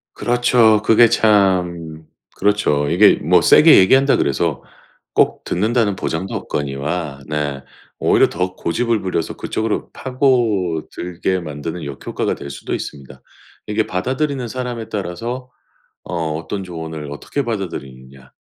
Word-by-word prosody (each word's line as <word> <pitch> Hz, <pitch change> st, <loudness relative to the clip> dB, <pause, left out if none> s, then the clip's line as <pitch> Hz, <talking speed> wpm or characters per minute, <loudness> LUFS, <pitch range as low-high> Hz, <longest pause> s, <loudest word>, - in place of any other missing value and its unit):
그렇죠. 120 Hz, -3 st, +3 dB
그게 115 Hz, +1 st, +5 dB
참 90 Hz, -7 st, +1 dB, 0.3 s
그렇죠. 95 Hz, -8 st, +1 dB
이게 95 Hz, +6 st, +6 dB
뭐 -, -, +3 dB
세게 -, -, +7 dB
얘기한다 135 Hz, +9 st, +5 dB
그래서 70 Hz, -, -1 dB, 0.5 s
꼭 -, -, +2 dB
듣는다는 110 Hz, +1 st, 0 dB
보장도 95 Hz, +1 st, -3 dB
없거니와 70 Hz, +1 st, -3 dB
네 75 Hz, -3 st, -2 dB, 0.4 s
오히려 -, -, +4 dB
더 90 Hz, +2 st, -3 dB
고집을 115 Hz, +6 st, -1 dB
부려서 90 Hz, -3 st, -2 dB
그쪽으로 110 Hz, -1 st, -3 dB
파고들게 95 Hz, -, -1 dB
만드는 80 Hz, +1 st, -6 dB
역효과가 70 Hz, -1 st, -3 dB
될 70 Hz, -, -8 dB
수도 70 Hz, -, -6 dB
있습니다. 65 Hz, -2 st, -7 dB, 0.5 s
이게 105 Hz, +1 st, 0 dB
받아들이는 130 Hz, +6 st, -2 dB
사람에 120 Hz, -2 st, -5 dB
따라서 115 Hz, +7 st, -5 dB, 0.5 s
어 80 Hz, -3 st, -3 dB
어떤 95 Hz, +5 st, -5 dB
조언을 80 Hz, -4 st, -7 dB
어떻게 140 Hz, -, -4 dB
받아들이느냐 65 Hz, -, -6 dB
90 Hz, 305 characters per minute, -19 LUFS, 80-115 Hz, 0.5 s, 세게